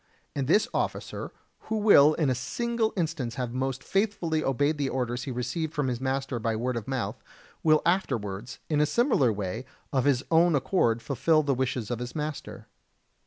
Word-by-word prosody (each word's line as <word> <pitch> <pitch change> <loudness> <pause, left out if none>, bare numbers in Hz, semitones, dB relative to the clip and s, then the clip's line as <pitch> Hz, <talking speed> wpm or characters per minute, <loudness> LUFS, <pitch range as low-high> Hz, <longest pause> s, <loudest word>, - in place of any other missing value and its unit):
And 135 -2 -1
this 205 +8 +4
officer, - - -3 0.4
who 220 - 0
will 155 -8 +6
in 150 -5 +1
a - - +3
single 225 - -1
instance 155 -9 -2
have 125 -2 -3
most 130 0 -2
faithfully 195 -6 0
obeyed 145 +3 +1
the 140 -2 0
orders 125 -1 -2
he 135 - -4
received 130 +6 -3
from 145 -3 0
his 125 0 -3
master 135 -1 -1
by 115 0 -1
word 125 +3 -1
of 115 -3 -4
mouth, 130 -2 -3 0.4
will 155 -1 +4
afterwards, 120 - -1
in 150 -2 +2
a 150 - +3
similar 235 - +3
way, 105 +3 -4 0.3
of 130 -2 +2
his 140 -2 +3
own 165 0 +5
accord 120 -6 +1
fulfil 155 +4 +2
the 140 -1 +1
wishes 125 -3 -2
of 120 - -2
his 125 0 -6
master. 150 -1 -5
135 Hz, 180 wpm, -27 LUFS, 125-160 Hz, 0.4 s, will